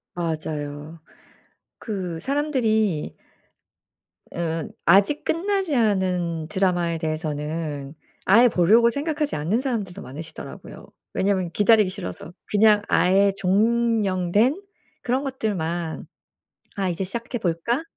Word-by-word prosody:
맞아요. 155 Hz, -2 st, -4 dB, 0.8 s
그 185 Hz, -7 st, -4 dB
사람들이 225 Hz, -, 0 dB, 1.2 s
으 165 Hz, -2 st, -3 dB, 0.2 s
아직 200 Hz, -, +4 dB
끝나지 380 Hz, -2 st, 0 dB
않은 180 Hz, -7 st, 0 dB
드라마에 175 Hz, -1 st, 0 dB
대해서는 155 Hz, -2 st, -4 dB, 0.3 s
아예 230 Hz, +6 st, +6 dB
보려고 220 Hz, +3 st, +4 dB
생각하지 295 Hz, +2 st, -2 dB
않는 165 Hz, +10 st, 0 dB
사람들도 205 Hz, -8 st, -3 dB
많으시더라고요. 155 Hz, +4 st, -9 dB, 0.3 s
왜냐하면 190 Hz, -3 st, 0 dB
기다리기 210 Hz, +1 st, +4 dB
싫어서 185 Hz, -3 st, -7 dB, 0.2 s
그냥 210 Hz, 0 st, +5 dB
아예 195 Hz, +2 st, +3 dB
종영된 210 Hz, -, +2 dB, 0.4 s
그런 255 Hz, +3 st, 0 dB
것들만 175 Hz, -, -3 dB, 0.7 s
'아 195 Hz, -2 st, -1 dB
이제 175 Hz, +2 st, -2 dB
시작해 235 Hz, +5 st, -4 dB
볼까?' 200 Hz, -, -1 dB
190 Hz, 255 characters per minute, -23 LUFS, 165-230 Hz, 1.2 s, 아예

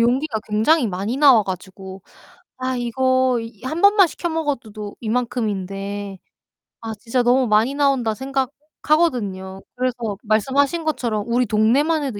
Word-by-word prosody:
용기가 245 Hz, +1 st, +1 dB
굉장히 235 Hz, +6 st, +3 dB
많이 200 Hz, +6 st, -3 dB
나와 275 Hz, -6 st, +6 dB
가지고 190 Hz, 0 st, -8 dB, 0.6 s
'아 255 Hz, 0 st, -2 dB
이거 255 Hz, +1 st, +1 dB
이 225 Hz, -1 st, -10 dB
1 315 Hz, +6 st, -3 dB
번만 400 Hz, -1 st, +6 dB
시켜 345 Hz, +1 st, -4 dB
먹어도 290 Hz, -8 st, -3 dB
도 210 Hz, -1 st, -8 dB
이만큼인데 205 Hz, -4 st, -3 dB, 0.6 s
아 225 Hz, -1 st, -5 dB
진짜 245 Hz, +3 st, 0 dB
너무 250 Hz, +1 st, +3 dB
많이 220 Hz, +5 st, +2 dB
나온다.' 275 Hz, -6 st, +1 dB
생각하거든요. 265 Hz, -, -2 dB
그래서 255 Hz, -1 st, -1 dB, 0.3 s
말씀하신 270 Hz, +9 st, +1 dB
것처럼 240 Hz, -8 st, -1 dB
우리 245 Hz, +2 st, +2 dB
동네만 260 Hz, +9 st, +2 dB
해도 245 Hz, -7 st, -4 dB
245 Hz, 310 characters per minute, -21 LUFS, 210-275 Hz, 0.6 s, 나와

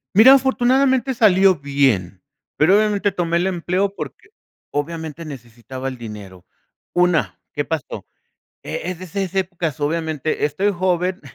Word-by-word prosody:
Mira, 250 Hz, +6 st, +9 dB
afortunadamente 265 Hz, 0 st, +2 dB
salió 195 Hz, -4 st, +5 dB
bien, 135 Hz, -, 0 dB, 0.3 s
pero 175 Hz, +6 st, +4 dB
obviamente 205 Hz, -2 st, +1 dB
tomé 170 Hz, -2 st, 0 dB
el 180 Hz, -, +1 dB
empleo, 190 Hz, +2 st, -1 dB
porque -, -, -8 dB, 0.4 s
obviamente 160 Hz, +2 st, -4 dB
necesitaba 130 Hz, -1 st, -8 dB
el 130 Hz, -, -5 dB
dinero. 105 Hz, -6 st, -10 dB, 0.5 s
Una, 160 Hz, -, +1 dB
¿qué 145 Hz, -, -3 dB
pasó?, 160 Hz, -4 st, -5 dB, 0.6 s
e 180 Hz, -, -4 dB
es 180 Hz, -, -8 dB
de 185 Hz, -, -7 dB
esas 190 Hz, +1 st, -4 dB
épocas 175 Hz, -5 st, -2 dB
obviamente 155 Hz, 0 st, -2 dB
estoy 150 Hz, +8 st, +1 dB
joven, 180 Hz, 0 st, -1 dB
170 Hz, 130 wpm, -20 LUFS, 140-195 Hz, 0.6 s, Mira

